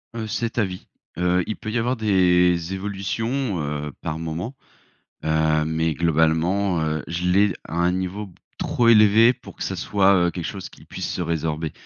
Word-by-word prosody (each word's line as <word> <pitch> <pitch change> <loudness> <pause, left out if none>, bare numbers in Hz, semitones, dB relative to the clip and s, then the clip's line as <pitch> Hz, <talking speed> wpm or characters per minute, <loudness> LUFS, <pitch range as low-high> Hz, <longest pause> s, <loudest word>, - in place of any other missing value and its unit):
Heu, 110 -2 -4
c'est 115 +2 -3
à 110 - +3
vie. 90 -1 -8 0.3
Heu, 90 +1 +2
il 110 - -2
peut 110 - -6
y 115 - -1
avoir 120 +3 0
des 90 -5 +2
évolutions, 105 +3 -2
heu, 75 0 -3
par 80 +1 -4
moment. 80 - -5 0.7
Heu, 80 0 +2
mais 80 0 0
globalement, 85 +3 +1
heu, 80 0 -1
je 85 +2 -2
l'ai 100 +2 +4
à 80 - -8
un 85 +1 +2
niveau 95 +3 -3
b 90 - -17 0.2
trop 120 -1 +1
élevé 110 +1 +6
pour - - -14
que - - -6
ça - - -3
soit, 100 -1 +3
heu, - - +1
quelque 85 -1 -6
chose 95 0 -6
qu'il - - -17
puisse - - -5
se - - -4
résorber. 80 -2 -2
90 Hz, 185 wpm, -23 LUFS, 80-105 Hz, 0.7 s, élevé